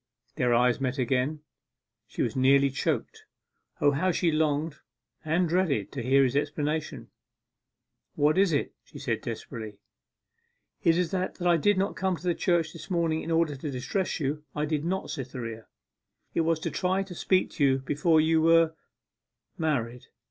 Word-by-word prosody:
Their 125 - +1
eyes 125 +1 +3
met 130 0 -1
again. 130 +4 0 0.7
She - - -2
was 115 - -2
nearly 135 +1 +4
choked. 135 - -2 0.5
O, 145 - +4
how 155 +7 0
she 170 0 +1
longed 155 0 0 0.5
and 170 +3 +1
dreaded 165 - 0
to 135 - -5
hear 135 +3 +4
his 130 0 0
explanation! 150 +1 -2 1.0
'What 150 +1 +3
is 190 -1 +3
it?' 145 - -1
she - - -13
said - - -2
desperately. 110 -3 -7 1.0
'It 165 0 +3
is 180 -2 0
that 185 0 -2
I 175 -1 +3
did 205 +5 +2
not 195 +2 0
come 190 -1 0
to 170 - -13
the 175 -1 +1
church 170 -2 0
this 160 -3 -10
morning 165 -3 0
in - - -6
order 165 -3 +1
to 145 +3 -5
distress 160 +10 -2
you: 150 +1 -2
I 150 0 0
did 150 -1 -1
not, 185 -1 -2
Cytherea. 125 -6 -6 0.7
It - - +2
was 165 0 +1
to - - -2
try 190 +1 0
to 190 -2 -10
speak 185 +2 +1
to 145 - -1
you 135 -1 +4
before 150 +4 +2
you 160 +1 +3
were 165 0 +4 0.9
married. 125 -7 -2
155 Hz, 170 wpm, -27 LUFS, 135-170 Hz, 1.0 s, nearly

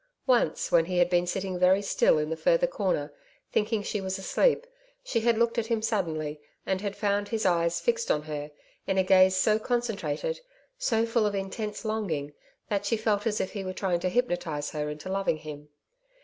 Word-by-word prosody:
Once, 245 - +2
when 165 -1 +5
he 180 +1 -2
had 175 0 +3
been 175 0 +2
sitting 185 0 -2
very 185 +2 +5
still 200 -5 +3
in 150 +1 -1
the - - 0
further - - +3
corner, - - -1 0.4
thinking 215 0 0
she 205 0 -2
was 190 0 -3
asleep, 465 - +2 0.4
she 250 - 0
had 230 0 +2
looked 235 +1 +2
at 225 - -2
him 230 -1 +1
suddenly, 160 -9 -2 0.2
and 190 0 -1
had 200 -1 -3
found 205 0 0
his 225 -1 -2
eyes 170 -2 +2
fixed 470 -1 0
on 150 - +1
her 150 -1 -5 0.4
in 190 - 0
a 190 - +4
gaze 185 0 +5
so 210 +3 +3
concentrated, 240 - -2 0.3
so 230 - +1
full 230 -2 +2
of 205 - -2
intense 210 +3 -4
longing, 170 -10 -2 0.3
that 205 -1 -1
she 230 +2 0
felt 215 -1 0
as 215 -1 0
if - - -2
he 200 -3 -5
were 185 0 -4
trying 185 -2 0
to 185 - -1
hypnotise 175 -10 -1
her 150 -1 -3
into 150 +4 -7
loving 195 -4 0
him. 150 -1 -9
195 Hz, 200 wpm, -28 LUFS, 175-225 Hz, 0.4 s, when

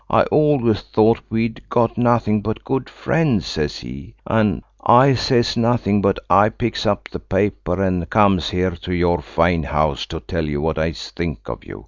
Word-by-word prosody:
I - - +4
always 145 -8 +2
thought 110 +1 +2
we'd 115 +1 -2
got 115 -1 +1
nothing 115 -3 +2
but 110 +1 -4
good 135 -1 -3
friends,' 135 - 0
says 75 -2 -3
he. 70 - -10
An 110 -4 +1 0.2
I 130 +3 +6
says 120 -1 +1
nothing, 115 -4 +1
but 100 -1 +2
I 100 +4 +5
picks 115 0 -3
up 100 -1 -1
the - - -6
paper, 100 -3 -2
and 90 -3 -1
comes 100 -4 +3
here 95 -2 0
to 90 +1 -5
your 85 0 +1
fine 85 0 +1
house 75 -1 -1
to - - -6
tell 80 -1 -4
you 75 -1 -2
what 80 +1 -1
I 80 +1 -1
think 85 -2 -6
of - - -7
you. - - -10
100 Hz, 180 wpm, -20 LUFS, 85-115 Hz, 0.2 s, I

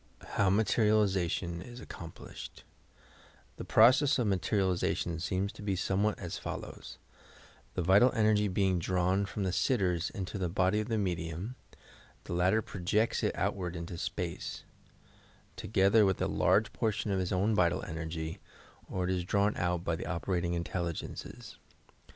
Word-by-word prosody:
HOW 100 - +2
MATERIALIZATION' 100 -4 +2
IS 120 +5 -10
ACCOMPLISHED 85 -9 -10 0.9
The - - -5
process 130 +6 +5
of 125 - +1
materialization 95 -3 0
seems 95 +3 -1
to - - -12
be 100 -2 -1
somewhat 100 +3 0
as 90 -3 -5
follows: - - -7 0.4
— - - -25
The 90 - 0
vital 100 +8 +6
energy 105 -2 +3
being 95 -1 +1
drawn 95 +3 +1
from 105 0 -4
the 95 - 0
sit 130 - +2
ters 90 -5 0
into 100 0 -5
the 90 -2 -1
body 95 +3 +2
of 110 - -2
the 115 -2 0
medium, 90 +2 -2 0.7
the - - -6
latter 90 +5 +2
projects 105 +4 0
it - - 0
outward 90 -3 -2
into 85 +1 -5
space, - - -4 0.9
together 100 +2 +3
with 95 -2 +2
a - - +1
large - - +2
portion 110 -1 -1
of 95 - +1
his 90 -1 -2
own 100 +4 +2
vital 90 -4 +2
energy, 80 0 -5 0.5
or 95 - -2
it 90 - 0
is 90 -1 0
drawn 100 +3 +1
out 90 -1 -1
by 85 - 0
the - - -6
operating 85 0 -1
intelligences. 85 0 -5
95 Hz, 150 wpm, -31 LUFS, 85-105 Hz, 0.9 s, vital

